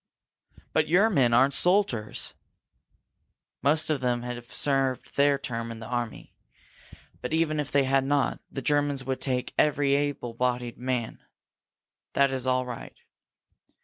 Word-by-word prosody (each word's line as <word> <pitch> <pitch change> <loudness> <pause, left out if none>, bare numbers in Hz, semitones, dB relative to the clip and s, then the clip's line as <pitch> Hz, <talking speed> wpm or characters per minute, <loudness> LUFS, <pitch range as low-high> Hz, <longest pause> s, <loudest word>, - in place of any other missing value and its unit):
"But 155 -1 +2
your 195 +7 +4
men 130 - +3
aren't 135 +4 +4
soldiers!" 175 - +1 1.3
"Most 155 +4 +2
of 145 -3 -1
them 120 -1 0
have 120 -1 -6
served 135 0 0
their 140 0 +4
term 115 -4 -4
in 115 - -7
the 110 - -9
army. 120 -1 -4 0.9
But, - - -4
even 160 -1 +1
if 150 - -2
they 140 -1 +3
had 135 0 +2
not, 140 +1 0
the 135 - -6
Germans 145 -1 +1
would 130 0 -3
take 125 -2 -1
every 145 -2 +3
able 140 -4 -1
bodied 125 0 -2
man. 125 -2 -2 0.9
That 140 -1 +3
is 130 -1 -2
all 130 0 +1
right. 125 -2 -8
135 Hz, 145 wpm, -27 LUFS, 125-145 Hz, 1.3 s, your